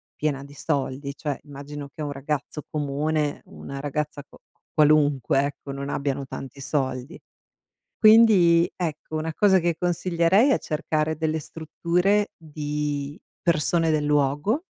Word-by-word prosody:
piena 145 -2 -2
di 140 - -14
soldi, 140 -1 -2
cioè 145 -3 -3
immagino 145 0 -8
che 155 - -8
un 145 - -3
ragazzo 145 +2 -4
comune, 150 +1 -1
una 140 0 -8
ragazza 145 0 -3
qua - - -19 0.4
qualunque, 145 -3 +3
ecco, 140 0 -6
non 140 +1 -5
abbiano 140 -1 -2
tanti 135 +1 -8
soldi. 130 +3 -2 0.8
Quindi 210 -7 +6
ecco, 155 -2 -4
una 155 +1 -2
cosa 195 -2 +5
che 170 -1 0
consiglierei 175 - +2
è - - +4
cercare 155 0 -1
delle 160 0 -1
strutture 175 +6 0
di 150 -2 -4 0.2
persone 165 0 +2
del 150 -1 +1
luogo. 150 - +1
150 Hz, 130 wpm, -24 LUFS, 140-165 Hz, 0.8 s, Quindi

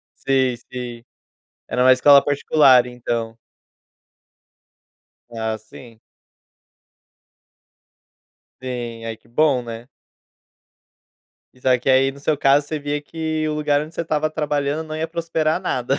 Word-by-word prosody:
Sim, 130 -2 +1 0.2
sim. 120 -2 -7 0.7
Era 125 - 0
uma 130 0 +7
escola 140 +2 +6
particular, 140 -3 +4
então? 115 -2 -4 1.9
Ah, 110 -1 -3
sim. 110 +1 -15 2.6
Sim. 120 -3 -6
Ai 115 -1 -5
que 115 - -28
bom, 135 0 +2
né. 115 +1 -8 1.7
Isso 125 - -13
aqui 125 0 +2
aí, 135 +1 +4
no 140 - -14
seu 150 +1 0
caso, 140 +1 +3
você 155 +1 -3
via 145 0 -3
que 155 0 -3
o 150 - -2
lugar 150 -1 +1
onde 155 +2 -8
você - - -2
estava 155 -1 0
trabalhando 150 0 -2
não 155 - -6
ia 160 +1 -3
prosperar 165 -2 -1
nada. 130 +2 -1
135 Hz, 125 wpm, -21 LUFS, 125-150 Hz, 2.6 s, uma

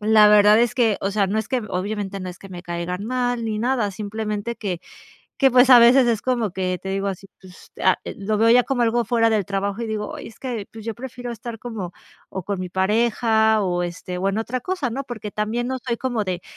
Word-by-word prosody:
la 215 0 +6
verdad 210 +1 +6
es 240 0 +1
que, 225 -5 +2
o 195 - -1
sea, 200 -2 +2
no 215 - 0
es 220 -2 -3
que 250 -2 -1
obviamente 195 +1 -3
no 185 - -5
es 180 - -12
que 195 - -12
me 180 -1 -8
caigan 175 +3 -4
mal 245 -1 -1
ni 215 -1 -2
nada, 235 -3 0
simplemente 215 +2 -4
que 180 -5 -4 0.6
que, 270 - +6
pues, 250 +1 +6
a 245 - +10
veces 245 +2 +6
es 225 -3 +1
como 240 -5 0
que, 185 -1 -2
te 190 - -6
digo 195 +1 -1
así, 195 0 -6
pues, 185 -1 -15 0.5
lo 210 +2 -1
veo 225 +1 +4
ya 245 +1 +6
como 265 -3 0
algo 235 0 +2
fuera 230 -2 +2
del 215 -3 +1
trabajo 200 +2 -2
y 230 - -2
digo, 210 -1 -4
ay, - - -9
es 225 - -16
que, 235 -6 -4
pues, 220 -1 -10
yo 225 - -3
prefiero 245 -1 -7
estar 230 0 -7
como, 210 -8 -6 0.4
o 190 - -5
con 200 0 -3
mi 180 - -4
pareja, 220 +2 +2
o 175 -1 0
este 180 +1 -6
o 195 +2 0
en 195 - -1
otra 235 +3 -2
cosa, 320 -6 -2
¿no? 270 +3 -4
Porque 215 -4 -6
también 225 +4 -2
no 260 - -1
soy 235 -1 0
como 240 -5 -2
de 180 -1 -3
215 Hz, 240 wpm, -22 LUFS, 195-240 Hz, 0.6 s, a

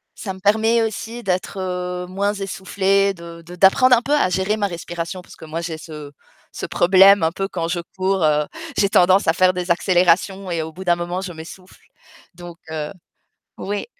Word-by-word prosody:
ça 190 -3 -5
me 190 - -13
permet 220 +3 +2
aussi 225 +2 -5
d'être, 185 0 -2
heu, 180 -1 -4
moins 200 +2 -1
essoufflée, 195 0 0
de 170 -1 -11
de 175 +1 -10
d'apprendre 250 +8 +5
un 230 - -1
peu 290 - -1
à 290 -11 +3
gérer 190 +4 0
ma 205 -2 0
respiration, 170 +1 -6
parce - - -15
que 160 - -12
moi, 160 +2 -5
j'ai 165 -2 -5
ce 150 -2 -9 0.4
ce - - -6
problème, 195 +2 +5
un 160 - +2
peu, 195 +2 -3
quand 170 -4 -3
je 175 +1 -2 0.2
cours, 190 -1 0
heu, 150 -1 +2 0.3
j'ai 200 - +3
tendance 185 0 +4
à 165 - +4
faire 185 +1 +3
des 180 0 -2
accélérations 185 +2 +2
et 165 -1 -1
au 160 - -7
bout 185 - -8
d'un 175 -2 +3
moment, 175 +2 -4
je 190 -2 -6
m'essouffle, 170 +3 -13 0.5
donc 175 -1 -11
heu, 150 -1 -4 0.7
oui. 205 +1 -4
185 Hz, 195 wpm, -20 LUFS, 170-195 Hz, 0.7 s, d'apprendre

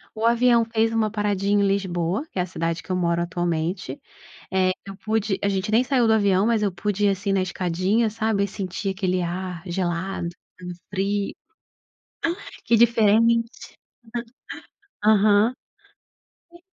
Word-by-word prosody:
O 220 +1 -2
avião 235 0 +4
fez 225 0 +1
uma 220 -1 +1
paradinha 205 -1 +1
em - - +3
Lisboa, 195 - -1
que - - -10
é - - +2
a - - -1
cidade 165 -2 -3
que - - -8
eu - - +1
moro 170 -1 +1
atualmente, 170 -3 -2 0.5
eh, 185 -1 +2 0.2
eu 195 0 -8
pude 215 -1 -1
a 200 - +2
gente 195 +1 -1
nem 230 +3 +5
saiu 255 -3 +2
do 220 - +4
avião, 200 -2 +3
mas 230 -2 +2
eu 205 - +2
pude 205 +3 -1
ir - - +5
assim 200 +1 -1
na 195 -1 +2
escadinha, 185 +5 0
sabe, 220 -2 0
e - - -3
sentir 195 0 -4
aquele 185 -1 -1
ar 180 0 -4
gelado, 175 0 -2 0.3
hum, 180 - -6 0.2
frio. 200 +1 -1 1.3
Que 235 - +4
diferente. 230 +1 +2 1.3
Aham. 210 +2 +4 1.0
E 345 - -16
200 Hz, 155 wpm, -23 LUFS, 185-220 Hz, 1.3 s, nem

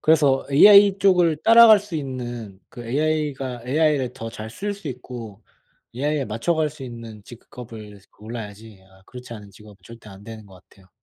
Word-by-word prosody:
그래서 145 -4 +2
ai 200 +6 +6
쪽을 180 -5 +3
따라갈 230 -1 +7
수 205 -4 -11
있는 120 -8 -7
그 120 - -11
ai가 140 -2 -2
ai를 145 -2 0
더 115 -2 -8
잘 110 0 -9
쓸 205 - -5
수 195 -7 -9
있고 120 -4 -9 0.5
ai에 145 +2 -2
맞춰갈 150 +8 -2
수 150 -2 -13
있는 115 -3 -10
직업을 110 -3 -12
골라야지 110 -1 -10
아 95 0 -23
그렇지 125 -1 -11
않은 105 -2 -12
직업은 105 0 -17
절대 115 -2 -14
안 95 0 -14
되는 110 -1 -11
것 95 - -17
같아요. 95 -1 -23
125 Hz, 325 characters per minute, -22 LUFS, 110-155 Hz, 0.5 s, 따라갈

